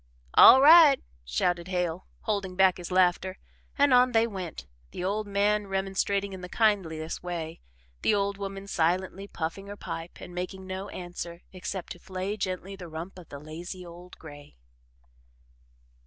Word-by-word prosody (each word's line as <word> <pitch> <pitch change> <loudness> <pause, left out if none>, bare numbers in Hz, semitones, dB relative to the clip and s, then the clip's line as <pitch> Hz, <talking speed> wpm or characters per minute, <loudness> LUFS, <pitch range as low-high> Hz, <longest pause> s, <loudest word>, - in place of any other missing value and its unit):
"All 265 +1 +9
right," 310 -3 +9 0.2
shouted 170 - -1
Hale, 180 -1 -2
holding 200 -4 -2
back 190 -1 +4
his 175 -1 -7
laughter, 185 +1 +2 0.4
and 285 -2 +4
on 250 0 +5
they 225 0 +4
went, 190 -7 -6 0.2
the 180 - -6
old 205 +3 -1
man 205 +1 +1
remonstrating 195 +1 -1
in 190 - -8
the 180 - -8
kindliest 180 -8 0
way 170 -2 -5 0.4
the - - +3
old 200 0 0
woman 195 0 -5
silently 185 +2 -1
puffing 175 +3 -5
her 205 0 -8
pipe 165 -2 -7
and 180 - -10
making 185 +2 -5
no 190 +2 -5
answer 175 -1 -7
except 185 0 -6
to 175 - -7
flay 190 +3 -4
gently 190 -1 -4
the 180 -3 -9
rump 165 +4 -7
of 170 - -14
the 140 - -8
lazy 170 +5 -8
old 175 +1 -12
gray. 145 - -13
185 Hz, 155 wpm, -28 LUFS, 175-200 Hz, 0.4 s, All